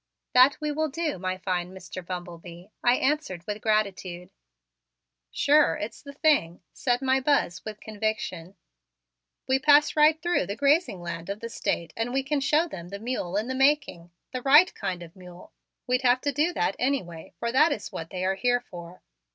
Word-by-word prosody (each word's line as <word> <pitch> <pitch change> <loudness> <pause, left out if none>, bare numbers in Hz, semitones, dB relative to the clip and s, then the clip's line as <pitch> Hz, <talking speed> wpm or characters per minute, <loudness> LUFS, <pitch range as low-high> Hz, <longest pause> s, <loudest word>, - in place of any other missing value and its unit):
"That 255 +3 +6
we 300 0 -2
will 310 +1 -1
do, 310 - -3
my 185 0 -2
fine 180 -1 -3
Mr. 185 0 -9
Bumble 175 -1 -6
Bee," 175 +3 -13
I 245 0 +5
answered 265 - -1
with 210 0 -5
gratitude. 190 -4 -1 1.0
"Sure, 295 - +3
it's 210 +2 -6
the 280 - -10
thing," 280 - +1
said 245 0 -1
my 265 0 +3
Buzz 265 -10 0
with 215 -1 -7
conviction. 210 -5 -4 0.9
"We 265 0 +2
pass 290 +1 +5
right 310 +1 +5
through 345 - 0
the 200 - -4
grazing 280 - +1
land 170 +1 -6
of 200 +1 -4
the 230 - -6
State 170 -7 -3
and 225 +2 -2
we 270 +1 0
can 285 +1 -1
show 300 +5 +2
them 175 - -9
the 200 - -6
mule 205 -5 -3
in 215 +3 -1
the 260 - -2
making 270 - +1 0.2
the 255 - -4
right 295 +8 +6
kind 180 -2 -4
of 165 -1 -14
mule. 180 -1 -14 0.3
We'd 250 0 +1
have 250 0 +3
to 290 - 0
do 300 +5 +1
that 195 - -1
anyway, 185 -12 -2
for 235 0 -2
that 305 +6 +4
is 205 - -4
what 165 0 -6
they 185 0 -4
are 190 - +2
here 245 +5 +1
for." 175 0 -10
225 Hz, 190 wpm, -26 LUFS, 180-280 Hz, 1.0 s, That